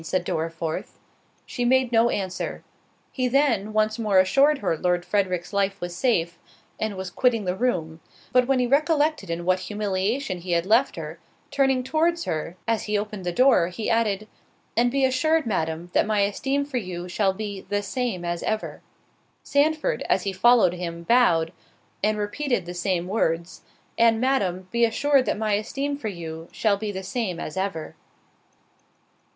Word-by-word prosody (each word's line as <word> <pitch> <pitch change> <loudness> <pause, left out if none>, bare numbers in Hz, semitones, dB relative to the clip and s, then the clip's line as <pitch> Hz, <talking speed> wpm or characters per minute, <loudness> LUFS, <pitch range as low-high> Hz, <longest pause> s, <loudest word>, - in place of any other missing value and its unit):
said 175 +2 -1
Dorriforth. 165 0 -3 0.5
She 245 - -3
made 255 0 +3
no 230 0 +4
answer. 190 -4 -3 0.5
He 255 -2 -1
then, 240 -6 +2
once 215 +1 +1
more 210 -4 +2
assured 275 +11 +4
her 190 -9 0
Lord 175 +2 0
Frederick's 185 -1 -1
life 200 0 0
was 175 0 -5
safe, 175 -6 0 0.4
and 215 -2 -2
was 190 -1 -5
quitting 230 -1 +1
the 180 0 -1
room—but 190 +3 -1
when 270 -1 +3
he 250 - +2
recollected 300 - +1
in 170 +1 -3
what 185 0 +2
humiliation 205 +2 -2
he 175 0 -3
had 170 0 +1
left 230 +7 +3
her, 160 0 -7 0.3
turning 270 -2 +2
towards 335 +5 +1
her 165 +3 -4
as 225 -2 0
he 210 0 0
opened 205 -3 -5
the - - +1
door, 250 -4 +4
he 195 +5 -3
added, 215 -2 +1 0.5
"And 240 +1 +3
be 270 +1 +2
assured, 310 +5 +2
Madam, 170 -4 -2
that - - +3
my 215 -2 +2
esteem 270 +8 0
for 280 -3 -4
you, 180 -5 -5
shall 195 +2 +1
be 200 -1 -5
the 205 0 0
same 205 -4 -3
as 175 0 -2
ever." 220 0 -3 0.6
Sandford, 310 +10 +1
as - - +2
he 195 - -2
followed 225 -2 +5
him, 170 -1 -5
bowed, 170 -7 +3 0.5
and 215 +1 +2
repeated 210 0 -1
the 175 - -6
same 175 0 -1
words—"And, 205 +4 -1
Madam, 195 -8 0
be 235 0 +1
assured 270 +4 +3
that - - 0
my 215 -1 0
esteem 275 +7 -2
for 280 -6 -5
you, 165 -4 -6
shall 210 -3 +1
be 210 +1 -4
the 190 -1 -6
same 190 -3 -3
as 155 - -6
ever." 190 -5 -3
205 Hz, 170 wpm, -24 LUFS, 180-250 Hz, 0.6 s, followed